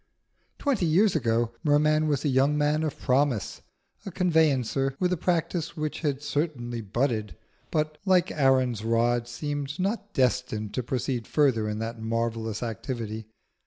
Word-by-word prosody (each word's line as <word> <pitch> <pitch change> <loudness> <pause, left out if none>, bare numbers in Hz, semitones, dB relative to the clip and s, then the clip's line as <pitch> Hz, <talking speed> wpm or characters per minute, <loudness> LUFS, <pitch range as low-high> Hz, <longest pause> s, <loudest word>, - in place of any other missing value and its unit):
Twenty 250 - +1
years 190 +5 +4
ago 115 -4 +1
Merman 155 +1 +3
was 145 -1 0
a - - +3
young 135 +3 +3
man 150 +1 +2
of 155 -3 -2
promise, 130 -4 0 0.4
a - - -5
conveyancer 145 - +1
with 180 0 +2
a - - +2
practice 170 -1 -1
which 155 -1 -3
had 145 -3 -2
certainly 145 -6 -2
budded, 110 0 -1 0.3
but, 155 -1 -1
like 185 -2 +3
Aaron's 130 -6 +2
rod, 120 +1 +1
seemed 145 +3 -4
not 205 +2 -2
destined 125 - 0
to 125 - -1
proceed 125 -1 -2
further 125 -8 +2
in 105 - -3
that 115 +1 -5
marvellous 115 -1 -2
activity. 110 -1 -4
135 Hz, 145 wpm, -27 LUFS, 115-155 Hz, 0.4 s, years